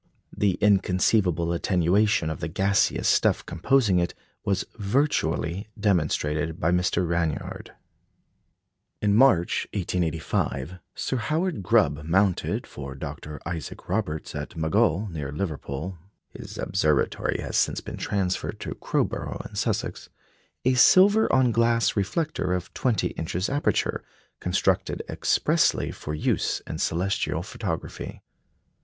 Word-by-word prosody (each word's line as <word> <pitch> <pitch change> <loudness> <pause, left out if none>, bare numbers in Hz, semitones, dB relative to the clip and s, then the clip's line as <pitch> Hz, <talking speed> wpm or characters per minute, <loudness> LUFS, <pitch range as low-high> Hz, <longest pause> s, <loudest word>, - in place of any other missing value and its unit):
The 100 -2 +2
inconceivable 95 -3 +2
attenuation 90 0 +2
of 80 - -5
the 75 - -3
gaseous 95 +4 +1
stuff - - +3
composing 110 -2 +2
it 85 - -1 0.3
was 100 -2 0
virtually 100 - 0
demonstrated 80 -5 0
by 80 - +2
Mr. 90 0 +1
Ranyard. 80 -3 -2 1.3
In 105 -1 +3
March, 105 -7 +4
1885, 85 -3 -1 0.2
Sir 130 - -2
Howard 155 - -1
Grubb 75 -4 +2
mounted 95 +3 +1
for 70 -1 -8
Dr. 75 +1 -7
Isaac 85 -4 -6
Roberts, 90 -5 -2
at 75 +3 -6
Maghull, 95 +4 +2
near 75 -4 -4
Liverpool 80 +1 -4 0.3
(his - - -9
observatory 75 -6 0
has - - -4
since - - +2
been - - -8
transferred 95 -2 -2
to - - -4
Crowborough - - -2
in - - -15
Sussex), - - -2 0.6
a 130 - +4
silver 195 - +6
on 130 -2 +4
glass 115 +1 +2
reflector 100 - -1
of 90 -1 -5
twenty 125 -4 0
inches 90 +6 -3
aperture, 145 +1 0 0.4
constructed - - 0
expressly - - +1
for 75 - -6
use 75 - 0
in - - -5
celestial 90 +4 0
photography. - - -5
90 Hz, 115 wpm, -26 LUFS, 80-105 Hz, 1.3 s, silver